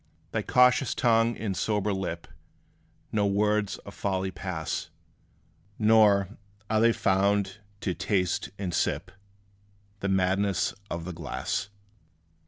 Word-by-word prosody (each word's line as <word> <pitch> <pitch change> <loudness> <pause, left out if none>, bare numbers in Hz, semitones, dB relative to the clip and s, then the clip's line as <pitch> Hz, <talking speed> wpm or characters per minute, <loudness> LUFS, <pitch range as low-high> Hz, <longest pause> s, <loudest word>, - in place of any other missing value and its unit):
Thy - - 0
cautious 125 +1 +4
tongue 115 -1 +3
and 100 -3 -3
sober 105 0 0
lip 90 -3 -4 0.8
No 105 -2 +2
words 105 0 +1
of 100 - -9
folly 95 -1 -2
pass, 90 -5 -4 0.9
Nor, 105 -3 +5 0.4
are 110 0 +3
they 115 +1 +6
found 100 -1 +1 0.2
to 95 - -1
taste 90 0 0
and 95 -3 -3
sip - - -1 0.9
The 100 - -2
madness 95 +1 +1 0.2
of 85 -1 -4
the 90 - -5
glass. 85 +4 -3
100 Hz, 115 wpm, -27 LUFS, 95-105 Hz, 0.9 s, they